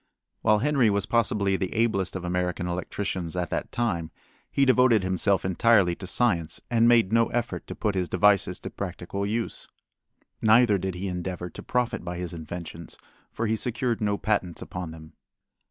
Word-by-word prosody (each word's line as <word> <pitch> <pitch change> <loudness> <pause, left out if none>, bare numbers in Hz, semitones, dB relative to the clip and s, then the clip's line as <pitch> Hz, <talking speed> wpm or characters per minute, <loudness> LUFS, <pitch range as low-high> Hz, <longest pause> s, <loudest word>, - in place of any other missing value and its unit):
While 110 -1 +4
Henry 135 -1 +3
was 100 -1 0
possibly 105 -4 +1
the 95 - -3
ablest 110 -5 0
of 90 -1 -4
American 90 0 -1
electricians 90 -1 -3
at 90 -1 -2
that - - -3
time, 90 -9 -1 0.4
he 140 - +2
devoted 125 -5 +4
himself 95 +1 +2
entirely 95 -1 +4
to 95 - -7
science 90 -6 +1
and 115 0 +4
made 115 -4 +4
no 115 0 +4
effort 120 0 -3
to - - -6
put 105 -2 -1
his 90 -2 -1
devices 100 -3 +3
to - - -6
practical 100 +1 -4
use. 115 +2 -3 0.7
Neither 110 -2 +5
did 95 0 -3
he 95 +2 -4
endeavor 90 -1 -4
to - - -9
profit 120 -4 -1
by 90 0 -5
his 90 -1 -5
inventions, 85 0 -7 0.3
for 115 - -3
he 110 0 +1
secured 120 +1 -1
no 105 -1 +1
patents 100 -6 -1
upon 90 -2 -6
them. 80 -1 -12
100 Hz, 170 wpm, -26 LUFS, 90-115 Hz, 0.7 s, Neither